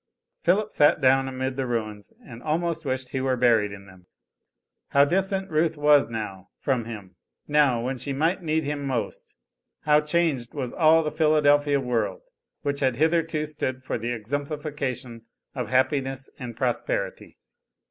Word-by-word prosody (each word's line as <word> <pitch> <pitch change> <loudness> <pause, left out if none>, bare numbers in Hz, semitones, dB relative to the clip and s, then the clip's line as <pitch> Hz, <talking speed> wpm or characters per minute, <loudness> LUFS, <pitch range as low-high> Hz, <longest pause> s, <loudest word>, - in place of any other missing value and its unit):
Philip 205 +5 +2
sat 145 - +4
down 135 -1 +4
amid 130 0 -3
the 135 -1 -1
ruins, 110 -4 -4
and 115 -1 -11
almost 165 +2 -1
wished 130 -1 -2
he 130 - -2
were 130 -1 0
buried 115 -4 +3
in 100 0 -10
them. 95 -2 -17 0.8
How 140 0 +5
distant 190 +3 0
Ruth 160 0 +1
was 145 -2 +4
now 105 -4 -6
from 125 -4 0
him, 105 -5 -9 0.3
now, 145 -6 +3
when 130 +1 -2
she 140 +3 -4
might 165 +7 0
need 160 -1 0
him 145 0 -3
most. 125 -4 -4 0.5
How 150 0 +4
changed 150 -6 0
was 130 -4 -3
all 160 0 +5
the 150 - -2
Philadelphia 145 -2 +3
world, 125 - -2 0.4
which 140 -1 -1
had 130 -3 +1
hitherto 160 +1 +1
stood 130 -4 -4
for - - -3
the 120 +2 -3
exemplification 140 -1 -4 0.3
of 125 -5 -3
happiness 135 +1 0
and 120 -3 -7
prosperity. - - -2
140 Hz, 155 wpm, -25 LUFS, 125-155 Hz, 0.8 s, How